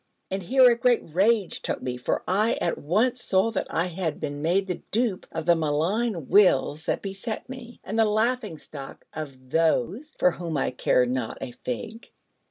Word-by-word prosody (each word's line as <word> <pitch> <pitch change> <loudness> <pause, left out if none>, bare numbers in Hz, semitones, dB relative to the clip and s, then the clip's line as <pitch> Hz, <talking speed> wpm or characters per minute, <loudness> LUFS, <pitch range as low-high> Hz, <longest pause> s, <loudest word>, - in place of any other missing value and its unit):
And 190 +1 -2
here 255 +7 +5
a - - +3
great 240 0 +2
rage 200 +1 +2
took - - -2
me, 125 -1 -2
for 125 - -2
I 210 +5 +2
at 170 - -1
once 225 - +1
saw 195 +4 +2
that 215 - -2
I 165 - 0
had 175 -3 -3
been 145 0 -4
made 180 +5 +2
the 180 -2 -4
dupe 225 -4 0
of 160 -1 -4
the 170 0 +5
malign 165 - 0
wills 180 -6 +4
that - - -1
beset 195 +5 -5
me, 250 -2 -9
and 220 +3 -3
the 225 - +6
laughing 220 -3 0
stock 140 -2 -10
of 130 -4 -8
Those 165 - +1
for 180 - +4
whom 170 -2 -4
I - - 0
care 125 0 +2
not 125 -2 -2
a - - -5
fig. 215 - -6
185 Hz, 185 wpm, -26 LUFS, 155-225 Hz, -, the